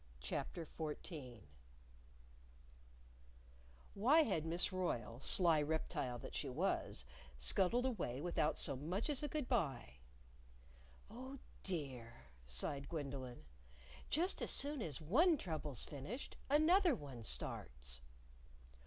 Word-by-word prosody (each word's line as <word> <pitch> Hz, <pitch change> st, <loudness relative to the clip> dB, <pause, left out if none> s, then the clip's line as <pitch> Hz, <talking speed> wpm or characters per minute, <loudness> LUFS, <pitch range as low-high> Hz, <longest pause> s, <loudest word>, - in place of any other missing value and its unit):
CHAPTER 145 Hz, -, -3 dB
XIV 150 Hz, -, -5 dB, 2.5 s
Why 270 Hz, +11 st, +6 dB
had 165 Hz, -, 0 dB
Miss 170 Hz, +4 st, +1 dB
Royle, 120 Hz, -11 st, -1 dB
sly 165 Hz, +1 st, +5 dB
reptile 145 Hz, -5 st, -1 dB
that -, -, -8 dB
she -, -, -2 dB
was, -, -, 0 dB, 0.3 s
scuttled 190 Hz, -, +3 dB
away 175 Hz, -, -1 dB
without 160 Hz, -1 st, +1 dB
so 140 Hz, -, +3 dB
much 180 Hz, -, -1 dB
as 280 Hz, -, +1 dB
a 295 Hz, -, 0 dB
good 295 Hz, -2 st, -2 dB
by? 140 Hz, -, 0 dB, 1.1 s
"Oh, 260 Hz, +4 st, -7 dB, 0.2 s
dear!" 125 Hz, -, -4 dB, 0.2 s
sighed 135 Hz, -, -1 dB
Gwendolyn; 135 Hz, -, -4 dB, 0.6 s
"just 350 Hz, +6 st, +3 dB
as -, -, -1 dB
soon 285 Hz, -1 st, +1 dB
as 155 Hz, -8 st, -2 dB
one 295 Hz, -, +5 dB
trouble's 155 Hz, -, -2 dB
finished, 155 Hz, -, -6 dB
another 325 Hz, +3 st, +6 dB
one 140 Hz, -, -8 dB
starts!" 65 Hz, -, -4 dB
160 Hz, 110 wpm, -40 LUFS, -, 2.5 s, Why